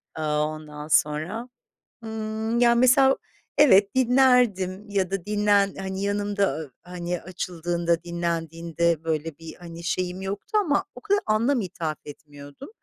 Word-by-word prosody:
Aaa, 150 Hz, -1 st, 0 dB
ondan 150 Hz, -1 st, -8 dB
sonra, 160 Hz, +11 st, 0 dB, 0.6 s
ımm, 220 Hz, +1 st, -2 dB
ya, 235 Hz, -1 st, +5 dB
mesela, 265 Hz, +2 st, +5 dB, 0.4 s
evet, 205 Hz, -9 st, +6 dB
dinlerdim 245 Hz, -7 st, +3 dB
ya 190 Hz, -3 st, 0 dB
da 195 Hz, -3 st, -3 dB
dinlen 205 Hz, -1 st, +2 dB
hani, 190 Hz, 0 st, -4 dB
yanımda, 205 Hz, 0 st, 0 dB
aaa, 155 Hz, -3 st, -7 dB, 0.2 s
hani, 175 Hz, 0 st, -3 dB
açıldığında 170 Hz, -1 st, -2 dB
dinlendiğinde, 170 Hz, -1 st, -1 dB
böyle, 160 Hz, -1 st, -2 dB
bir, 165 Hz, -1 st, -9 dB
hani, 170 Hz, -1 st, -10 dB
şeyim 180 Hz, +2 st, -2 dB
yoktu 200 Hz, -, -2 dB
ama 300 Hz, -8 st, +1 dB
o -, -, -10 dB
kadar 405 Hz, -1 st, +1 dB
anlam 230 Hz, +5 st, +2 dB
ithaf 165 Hz, -5 st, -4 dB
etmiyordum. 145 Hz, -, -11 dB
185 Hz, 130 wpm, -25 LUFS, 165-220 Hz, 0.6 s, evet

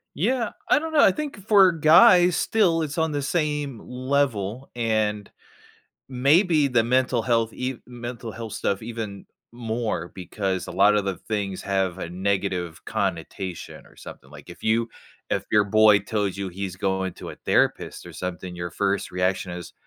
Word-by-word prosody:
Yeah. 230 Hz, -, 0 dB, 0.2 s
I -, -, +5 dB
don't 320 Hz, 0 st, -5 dB
know, 295 Hz, -, +5 dB
I 195 Hz, -, +7 dB
think 275 Hz, -6 st, -6 dB
for 195 Hz, -4 st, +6 dB
guys, 175 Hz, +3 st, +6 dB
still, 180 Hz, -7 st, +2 dB
it's 150 Hz, +2 st, -5 dB
on 160 Hz, -1 st, +1 dB
the 145 Hz, -1 st, -2 dB
same 150 Hz, -5 st, -2 dB
level, 130 Hz, -3 st, -2 dB
and 110 Hz, -3 st, -1 dB, 0.8 s
maybe 150 Hz, +4 st, +3 dB
the 120 Hz, -3 st, +2 dB
mental 125 Hz, 0 st, +1 dB
health 115 Hz, -1 st, 0 dB
ev 130 Hz, -1 st, -3 dB
mental 120 Hz, -2 st, -7 dB
health 110 Hz, -1 st, -7 dB
stuff 100 Hz, -2 st, -1 dB
even 110 Hz, -3 st, -6 dB, 0.3 s
more, 115 Hz, -7 st, -3 dB
because 95 Hz, 0 st, -3 dB
a -, -, -6 dB
lot 105 Hz, +2 st, +4 dB
of 100 Hz, -1 st, +1 dB
the 95 Hz, -3 st, -2 dB
things 100 Hz, -3 st, -2 dB
have 95 Hz, -2 st, -1 dB
a 85 Hz, -, -5 dB
negative 95 Hz, -2 st, -2 dB
connotation, 90 Hz, -3 st, -4 dB
or -, -, -20 dB
something. 65 Hz, -, -12 dB
Like, 75 Hz, +3 st, -13 dB
if 85 Hz, -, -12 dB
you 115 Hz, +1 st, +1 dB, 0.4 s
if -, -, -1 dB
your 105 Hz, -1 st, +5 dB
boy 105 Hz, 0 st, +5 dB
tells 105 Hz, -2 st, -2 dB
you 100 Hz, -1 st, -4 dB
he's 95 Hz, 0 st, -5 dB
going 95 Hz, -1 st, -1 dB
to -, -, -9 dB
a -, -, -8 dB
therapist, -, -, 0 dB
or 85 Hz, -, -11 dB
something, 90 Hz, +2 st, -6 dB
your 85 Hz, 0 st, -5 dB
first 100 Hz, 0 st, -1 dB
reaction 90 Hz, 0 st, -1 dB
is, 85 Hz, -1 st, -8 dB
110 Hz, 170 wpm, -24 LUFS, 95-140 Hz, 0.8 s, I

